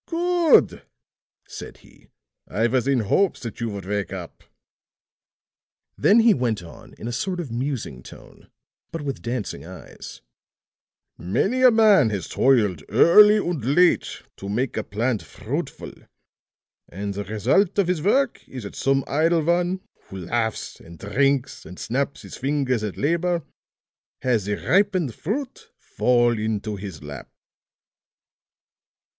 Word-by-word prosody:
"Good," 345 -1 +3 0.7
said - - -9
he. - - -21 0.4
"I 115 - 0
was 125 +2 +1
in 135 -3 +2
hopes 185 - +1
that 115 -1 -7
you 115 - -1
would 100 -3 -7
wake 100 0 -2
up." 90 -3 -8 1.5
Then 220 +3 +5
he 225 -1 +6
went 115 -7 -1
on 85 - -14
in 115 - -8
a - - -3
sort 180 +10 -3
of 155 -9 -5
musing 120 - -4
tone, - - -15 0.4
but 165 -2 -5
with 140 -2 -4
dancing 120 -3 -4
eyes: - - -11 1.0
"Many 195 - 0
a 255 - +8
man 215 - +5
has 100 -5 -4
toiled 105 - +2
early 210 - +7
and 175 - -2
late 170 +8 +2
to 100 - -7
make 120 +5 -1
a 110 - -2
plant 115 +2 -1
fruitful; 130 +9 -6 1.0
and 100 +2 -5
the 100 +1 -4
result 125 - +1
of 200 -3 +3
his 180 -4 0
work 240 - +1
is 130 -3 -8
that 100 - -8
some 135 0 +1
idle 160 +2 +2
one, 175 +3 +1 0.2
who 95 - -9
laughs 110 +3 -2
and 85 0 -13
drinks 135 - 0
and 90 +3 -11
snaps 140 +4 -3
his - - -9
fingers 135 -4 -1
at 105 -3 -4
labor, 170 +3 0 0.8
has 120 -6 +1
the 105 0 -1
ripened 185 - +1
fruit 280 - -5
fall 120 -2 +1
into 105 -1 -2
his 95 -6 -8
lap." 70 -3 -9
130 Hz, 140 wpm, -23 LUFS, 105-175 Hz, 1.5 s, a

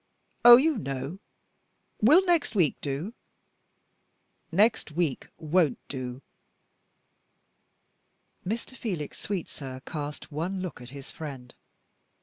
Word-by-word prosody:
"Oh, 240 0 +12
you 290 -1 +2
know. 140 +3 -5 0.8
Will 310 - +6
next 340 - +2
week 170 -8 +3
do?" 145 +10 -3 1.4
"Next 210 +4 +3
week 160 -5 -1
won't 160 -3 +2
do." 130 -1 -6 2.2
Mr. 230 +6 -4
Felix 180 - -4
Sweetsir 140 -9 -5
cast 150 -1 -6
one 170 +6 -3
look 185 -8 -6
at 120 - -10
his 140 0 -10
friend. 135 -6 -8
160 Hz, 100 wpm, -27 LUFS, 140-210 Hz, 2.2 s, Oh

